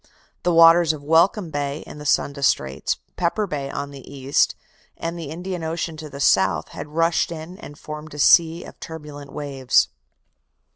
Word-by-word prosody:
The 175 - +1
waters 165 0 +7
of 145 -2 -9
Welcome 165 +4 +3
Bay 145 0 -3
in - - -10
the 150 - -5
Sunda 140 0 +1
Straits, 70 - 0 0.2
Pepper 195 +5 0
Bay 145 -7 -4
on 140 +1 -5
the 140 -1 -11
east, 135 0 +1 0.4
and 165 +1 -4
the 165 -4 -6
Indian 175 +2 -5
Ocean 160 0 -3
on 155 - -8
the 140 0 -9
south, 95 - +3
had - - -7
rushed 165 +3 +1
in 170 +4 -8
and 145 -8 -11
formed 150 0 -8
a - - -8
sea 165 +3 +5
of - - -13
turbulent 150 -3 -9
waves. 135 -3 +1
155 Hz, 175 wpm, -22 LUFS, 140-165 Hz, 0.4 s, waters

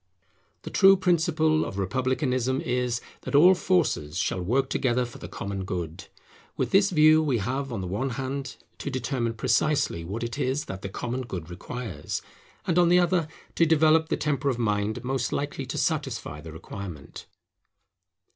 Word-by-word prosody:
The - - -7
true 195 0 +6
principle 160 -3 +2
of 95 - -5
republicanism 130 - 0
is, 125 -5 -1 0.2
that - - -3
all 175 +6 +8
forces 165 - 0
shall 90 -1 0
work 130 +9 +1
together 125 -1 +1
for 120 - -11
the - - -7
common 100 -1 -5
good. 85 -4 -5 0.5
With - - -1
this 195 +1 +5
view 155 -2 +6
we 140 -6 +1
have 130 +6 -2
on 110 -5 -3
the 90 - -4
one 105 +9 -2
hand, 135 0 -4 0.2
to - - -4
determine 125 -3 -2
precisely 125 - +1
what 100 +8 -4
it 120 -2 -4
is 135 +4 0
that 95 0 -7
the 95 - -5
common 120 +6 -3
good 90 -9 -6
requires; 110 +3 -5 0.4
and 175 +1 +2
on 175 -1 +5
the 180 - +6
other, 175 -2 +2 0.3
to 165 - +3
develop 160 0 +4
the - - 0
temper 145 -2 0
of 130 - -1
mind 105 -2 -1
most 130 0 -1
likely 145 +1 -3
to - - -4
satisfy 75 +1 -2
the 80 +1 -9
requirement. 80 -2 -9
130 Hz, 170 wpm, -26 LUFS, 100-155 Hz, 0.5 s, all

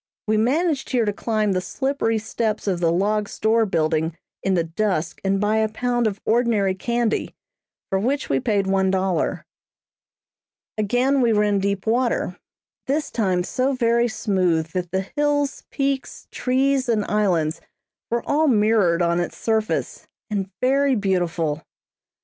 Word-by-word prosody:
We 215 -1 +1
managed 280 +7 +1
here 240 -3 +1
to 205 - 0
climb 215 -1 0
the 185 -1 0
slippery 265 0 -1
steps 220 0 -2
of 190 -4 0
the 165 -1 +2
log 205 +4 0
store 220 +1 +1
building 160 -1 0 0.2
in 190 0 +1
the 170 - +2
dusk 170 -1 -2
and 195 0 +1
buy 210 +2 +1
a 220 0 +2
pound 240 +1 0
of 205 -2 -3
ordinary 220 -4 +2
candy, 235 +3 -1 0.5
for 190 - 0
which 265 +7 -1
we 135 - +1
paid 205 - 0
one 190 0 +2
dollar. 185 -3 0 1.3
Again 245 +6 +1
we 235 -2 +3
were 210 0 +3
in 205 -1 +2
deep 200 0 -1
water. 235 -5 0 0.5
This 295 +3 -1
time 185 -6 +1
so 255 +8 0
very 235 -1 +2
smooth 180 -7 0
that 180 -1 -3
the 190 +1 -1
hills, 290 -1 0
peaks, 275 -1 -3
trees 265 0 +1
and 215 -3 +1
islands 180 -7 0 0.5
were 235 0 -2
all 310 +2 +2
mirrored 210 - +3
on 170 0 +1
its 175 - -3
surface, 220 -1 -1 0.2
and 195 -2 -2
very 270 +1 +3
beautiful. 175 -6 -1
215 Hz, 150 wpm, -22 LUFS, 190-240 Hz, 1.3 s, we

